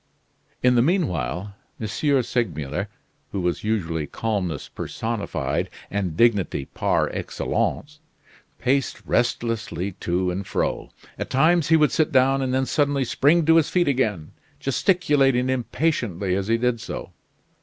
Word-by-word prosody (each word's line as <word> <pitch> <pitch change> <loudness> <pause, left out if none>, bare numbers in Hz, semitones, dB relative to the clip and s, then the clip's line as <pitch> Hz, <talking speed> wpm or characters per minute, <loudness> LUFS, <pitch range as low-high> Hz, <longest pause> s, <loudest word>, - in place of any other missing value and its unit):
In 125 0 +5
the 120 - +4
mean 170 +4 +2
while, 90 - -3 0.3
M. 110 - -3 0.4
Segmuller 80 - -2 0.4
who 100 - -2
was 90 -1 -1
usually 85 -8 -1
calmness 95 -9 -2
personified, 115 -2 -3 0.2
and 95 -5 -2
dignity 105 - +2
par - - 0
excellence, 145 +1 -2 0.6
paced 135 +2 0
restlessly 110 -6 -1
to 90 +1 0
and 95 +2 -4
fro. - - -2 0.3
At - - -4
times 160 +4 +3
he 160 - +5
would 150 -3 +3
sit 155 0 +1
down 135 0 +4
and 130 -1 -1
then 130 +1 +1
suddenly 140 -1 +1
spring 150 +7 +3
to 165 +1 +6
his 160 - +3
feet 175 -3 +2
again, 105 - 0 0.3
gesticulating 135 -5 +2
impatiently 120 - -1
as 95 0 -2
he 115 +1 +3
did 120 -1 0
so. - - -6
120 Hz, 135 wpm, -23 LUFS, 95-140 Hz, 0.6 s, to